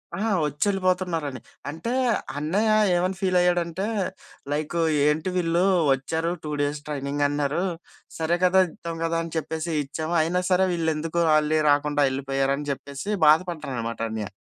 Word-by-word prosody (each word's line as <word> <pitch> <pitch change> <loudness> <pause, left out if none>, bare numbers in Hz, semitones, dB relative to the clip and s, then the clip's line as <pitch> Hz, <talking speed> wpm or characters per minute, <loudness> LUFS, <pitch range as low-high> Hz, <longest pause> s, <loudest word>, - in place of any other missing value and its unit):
ఆహా! 215 +2 -1
వచ్చి 150 +4 -1
వెళ్ళిపోతున్నారని. 180 -7 0 0.3
అంటే, 165 +10 -4 0.5
అన్నయ్య 195 +9 +1 0.2
ఏమని 185 +2 0
ఫీలైయ్యాడంటే 180 -1 +1 0.7
లైకు 150 +3 -2 0.3
"ఏంటి 155 +4 +1
వీళ్ళు 170 0 +1 0.3
వచ్చారు 160 +5 -2
2 150 - -4
డేస్ 145 0 -1
ట్రైనింగ్ 145 0 -1
అన్నారు. 145 +4 -1 0.5
సరే 165 +2 +1
కదా! 190 +1 +5
ఇద్దాం 165 +1 -7
కదా! 165 0 0
అని 165 - -8
చెప్పేసి 160 +2 -3
ఇచ్చాము. 155 +4 -4
అయినా 180 +3 0
సరే, 185 +1 +4
వీళ్ళు 165 -2 0
ఎందుకు 165 +2 -1
వాళ్ళే 155 0 +3
రాకుండా 145 0 +2
వెళ్ళిపోయారు?" 135 0 -1
అని 145 0 -5
చెప్పేసి 140 +6 -8 0.2
బాధపడ్డారు 160 -2 +2
అన్నమాట 115 -1 -4
అన్నయ్య. 110 -3 -4
160 Hz, 140 wpm, -25 LUFS, 145-175 Hz, 0.7 s, కదా